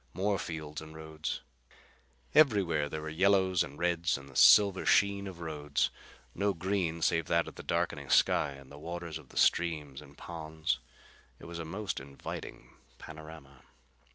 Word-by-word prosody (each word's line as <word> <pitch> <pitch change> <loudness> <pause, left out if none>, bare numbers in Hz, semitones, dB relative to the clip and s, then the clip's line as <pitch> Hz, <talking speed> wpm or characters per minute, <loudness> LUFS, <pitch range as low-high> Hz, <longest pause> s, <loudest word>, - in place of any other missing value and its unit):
More 100 +1 +1
fields 75 -2 -5
and 80 0 -11
roads. 80 0 -5 0.9
Everywhere 95 - +4
there 75 0 -5
were 80 - -4
yellows 95 +1 +3
and 70 +1 -4
reds 85 -1 +1
and 70 0 -12
the 65 - -15
silver 100 +3 +7
sheen 100 0 +3
of 95 -3 -8
the 85 - -8
roads. 75 -3 -1 0.4
No 100 +1 0
green 85 -2 -1
save 80 -2 +2
that 85 0 +2
of - - -8
the - - -9
darkening - - -2
sky 70 - +3
and 70 0 -14
the 70 - -11
waters 85 0 -5
of 70 - -17
the - - -12
streams 75 -5 +1
and 70 -1 -16
ponds. 80 -2 -3 0.6
It - - -13
was 85 0 -7
a 85 - -4
most 95 +5 -4
inviting 70 +1 -9 0.2
panorama. 80 -4 -11
80 Hz, 165 wpm, -31 LUFS, 75-90 Hz, 0.9 s, silver